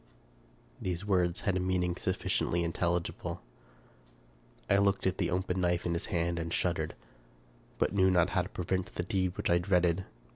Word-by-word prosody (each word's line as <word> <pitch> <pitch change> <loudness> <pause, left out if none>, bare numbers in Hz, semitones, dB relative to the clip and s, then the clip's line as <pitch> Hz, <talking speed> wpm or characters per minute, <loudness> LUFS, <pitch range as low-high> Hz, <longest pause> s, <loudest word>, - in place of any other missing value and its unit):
These 90 +1 -2
words 90 -4 +1
had 100 -4 0
a - - +1
meaning 90 -1 0
sufficiently 85 -1 0
intelligible. 85 +1 -1 1.3
I 100 - +4
looked 100 0 +2
at 95 - 0
the 85 - +1
open 90 0 -1
knife 90 -1 +1
in 85 - 0
his 85 +3 -2
hand 85 -3 0
and 85 0 -3
shuddered, 85 -3 0 0.8
but - - +1
knew 95 -2 +4
not 90 -1 +3
how 95 - +2
to 90 - -6
prevent 95 +1 -2
the 90 - -1
deed 95 0 -1
which - - 0
I 85 - +5
dreaded. 90 0 +2
90 Hz, 170 wpm, -31 LUFS, 85-95 Hz, 1.3 s, I